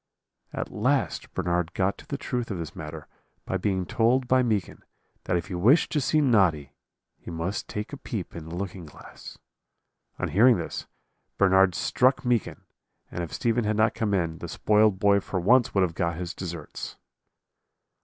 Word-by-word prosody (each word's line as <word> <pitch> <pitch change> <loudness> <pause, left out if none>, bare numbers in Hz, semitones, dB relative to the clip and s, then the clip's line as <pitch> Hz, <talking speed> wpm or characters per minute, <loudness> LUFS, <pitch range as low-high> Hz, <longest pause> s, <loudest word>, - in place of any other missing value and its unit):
"At - - -4
last - - 0
Bernard 90 -1 -1
got 95 +1 0
to - - -14
the 140 - -3
truth 125 -3 -3
of 100 - -3
this 85 -3 -6
matter 75 0 -8 0.4
by 95 - -1
being 95 -1 -1
told 120 +4 +2
by 130 +1 +4
Meekin 110 -7 -1 0.4
that 90 - +1
if 85 - -3
he 100 - -7
wished 110 - +4
to 150 - +1
see 155 +4 +2
Noddy, 95 - +2 0.5
he - - -10
must 85 +4 -3
take 105 +6 -5
a - - -5
peep 110 -9 -6
in 80 -1 -8
the 85 - -6
looking 90 -2 -5
glass. 75 - -12 0.8
On - - -2
hearing 115 +4 +5
this, 85 - -5 0.5
Bernard 95 -2 +4
struck 130 +7 +2
Meekin, 120 -3 0 0.5
and 90 - -3
if 80 - -6
Stephen 120 0 0
had 105 0 0
not 110 +1 +3
come 105 -3 0
in, 85 -3 -1
the - - -6
spoiled 105 -2 +3
boy 100 +1 +4
for 95 -1 -3
once 120 +8 +4
would 95 - +4
have 85 -3 -1
got 85 -1 -1
his 90 +2 -5
deserts. 85 -4 -7
95 Hz, 180 wpm, -26 LUFS, 85-115 Hz, 0.8 s, hearing